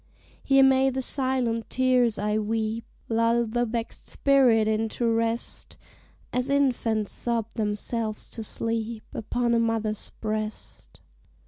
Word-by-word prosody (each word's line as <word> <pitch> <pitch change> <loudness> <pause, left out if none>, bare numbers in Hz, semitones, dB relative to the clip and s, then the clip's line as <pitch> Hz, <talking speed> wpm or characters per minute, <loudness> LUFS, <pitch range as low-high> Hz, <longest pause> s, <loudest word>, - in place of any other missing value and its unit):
Here 270 0 +5
may 265 0 +5
the 265 0 -2
silent 255 -4 -1
tears 250 -3 +2
I 210 +1 0
weep 220 +1 -2 0.2
Lull 230 +1 +2
the 240 +2 -1
vexed 230 0 -5
spirit 250 -6 +4
into 220 +2 0
rest, 230 +1 -1 0.6
As 250 +2 0
infants 240 -7 +1
sob 230 -2 -2
themselves 215 0 -2
to 225 - -4
sleep 225 0 -3
Upon 235 +2 -1
a 230 - +3
mother's 225 -2 -1
breast. 215 0 -5
230 Hz, 120 wpm, -26 LUFS, 220-245 Hz, 0.6 s, Here